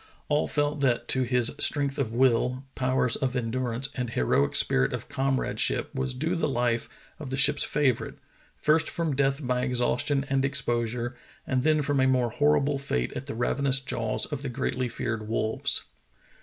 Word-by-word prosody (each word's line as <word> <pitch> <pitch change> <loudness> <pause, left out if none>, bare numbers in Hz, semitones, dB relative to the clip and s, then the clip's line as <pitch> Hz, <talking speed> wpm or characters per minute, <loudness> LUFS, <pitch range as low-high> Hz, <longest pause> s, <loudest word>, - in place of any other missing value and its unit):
All 150 0 +2
felt 145 +1 0
that 120 -3 +1
to 130 - +2
his 125 -1 +2
strength 140 -1 +3
of 125 -5 -1
will, 125 +1 +2
powers 130 -2 +1
of 130 -1 -2
endurance, 125 +1 -2
and 125 -2 -3
heroic 70 - +1
spirit 65 0 +2
of - - -5
comradeship 135 -1 -1
was 130 -1 -2
due 160 +7 -1
the 165 - 0
life 120 -2 0 0.3
of 150 -4 -7
the 135 - -2
ship's 140 - +4
favorite, 135 -5 0 0.4
first 155 +1 +2
from 165 -4 -2
death 135 +1 0
by 125 0 0
exhaustion 125 +3 0
and 135 0 +1
exposure 120 -3 -1 0.3
and 130 -1 0
then 155 +1 +2
from 140 -1 0
a 130 - +4
more 125 -3 +2
hor 145 +5 +3
rible 140 0 -1
fate 60 - -2
at 135 - -6
the 140 - -5
ravenous 135 +3 +1
jaws 115 -4 -1
of 145 -3 -5
the 140 - -4
greatly 125 0 -2
feared 110 -2 -3
wolves. 110 0 0
130 Hz, 175 wpm, -27 LUFS, 120-140 Hz, 0.4 s, ship's